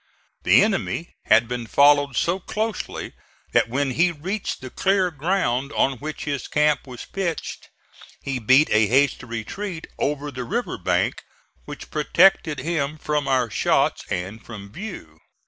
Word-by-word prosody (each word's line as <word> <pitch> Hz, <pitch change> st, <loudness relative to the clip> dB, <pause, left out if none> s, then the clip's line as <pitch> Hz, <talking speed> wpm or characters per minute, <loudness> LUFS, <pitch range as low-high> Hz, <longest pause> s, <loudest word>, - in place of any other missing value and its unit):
The -, -, +6 dB
enemy 195 Hz, -5 st, -2 dB
had 115 Hz, +2 st, +5 dB
been 120 Hz, -1 st, -4 dB
followed 145 Hz, +1 st, +4 dB
so 175 Hz, +3 st, +1 dB
closely 220 Hz, +3 st, -4 dB, 0.4 s
that -, -, +3 dB
when 135 Hz, +2 st, 0 dB
he 170 Hz, +6 st, +3 dB
reached 185 Hz, +6 st, -4 dB
the 130 Hz, -1 st, -9 dB
clear 190 Hz, -2 st, +1 dB
ground 145 Hz, -4 st, 0 dB
on 135 Hz, -3 st, +1 dB
which 155 Hz, +1 st, -6 dB
his 140 Hz, -4 st, -3 dB
camp 150 Hz, -2 st, +1 dB
was 125 Hz, -2 st, -8 dB
pitched 180 Hz, -4 st, -4 dB, 0.5 s
he 135 Hz, -2 st, -3 dB
beat 130 Hz, +7 st, +4 dB
a 110 Hz, 0 st, +4 dB
hasty 135 Hz, +4 st, +2 dB
retreat 160 Hz, -, -5 dB
over 145 Hz, 0 st, -1 dB
the 125 Hz, -2 st, -5 dB
river 235 Hz, -, -3 dB
bank, -, -, 0 dB, 0.4 s
which -, -, -9 dB
protected 155 Hz, -7 st, +3 dB
him 155 Hz, -1 st, -2 dB
from 150 Hz, -2 st, -1 dB
our 130 Hz, -4 st, +1 dB
shots -, -, +1 dB
and 95 Hz, +5 st, -4 dB
from 100 Hz, -3 st, -10 dB
view. 130 Hz, -, -8 dB
145 Hz, 145 wpm, -23 LUFS, 125-175 Hz, 0.5 s, The